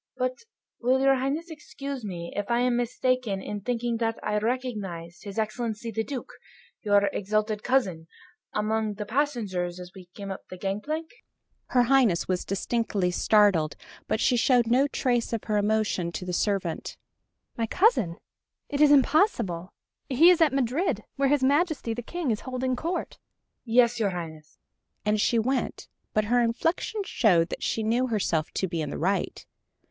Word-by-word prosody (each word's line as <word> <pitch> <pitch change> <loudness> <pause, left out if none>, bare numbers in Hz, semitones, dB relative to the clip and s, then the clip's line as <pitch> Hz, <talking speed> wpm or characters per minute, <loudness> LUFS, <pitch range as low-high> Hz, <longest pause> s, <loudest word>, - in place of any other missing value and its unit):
But, 255 - -2 0.3
will 255 +2 +2
your 270 0 +5
Highness 280 +6 -2
excuse 280 -4 -7
me 175 -4 -6
if 205 +1 -3
I 235 0 +2
am 250 -1 +2
mistaken 245 -3 0
in 205 +1 -5
thinking 240 +1 -1
that 225 0 -1
I 210 - 0
recognized 210 -9 -4
his 200 0 -7
Excellency 220 +1 -2
the 220 +1 -1
Duke, 265 0 -6 0.5
your 205 -2 +3
exalted 215 +1 -1
cousin, 190 -12 0 0.4
among 215 0 -1
the 210 +1 -5
passengers 205 -9 -1
as 180 0 -9
we 185 -2 -12
came 200 -1 -6
up 190 - -6
the 185 - -8
gangplank...?" 210 - -3 0.6
Her 250 -1 +3
Highness 240 -8 +3
was 185 -1 0
distinctly 200 -2 -1
startled, 185 -6 +3 0.3
but - - 0
she 250 - +3
showed 245 0 +4
no 255 +5 +3
trace 245 -4 0
of 225 - -2
her 210 -1 0
emotion 205 -4 0
to 180 - -5
the 180 - -4
servant. 190 -3 -1 0.6
"My 230 -1 -1
cousin 245 - +2 0.5
it 285 0 -1
is 295 -1 +7
impossible. 265 - +3 0.4
He 310 +7 +7
is 345 - +3
at 315 -4 +5
Madrid, 270 +6 0
where 275 -1 +2
his 285 -2 +2
Majesty 285 -3 +1
the 245 - -4
King 330 +1 -3
is 215 - -1
holding 255 0 -2
Court." 335 +7 -4 0.5
"Yes, 240 0 +3
your 210 -3 +2
Highness," 160 -4 -7 0.5
and 210 0 +2
she 235 - +2
went, 255 +4 -1 0.2
but 215 0 +1
her 245 +3 +3
inflection 330 - 0
showed 175 - +3
that - - -5
she 225 - -1
knew 240 +4 +1
herself 180 -9 0
to 190 - 0
be 170 -2 -3
in 150 - -3
the - - -5
right. 195 +4 -1
225 Hz, 165 wpm, -27 LUFS, 195-260 Hz, 0.6 s, is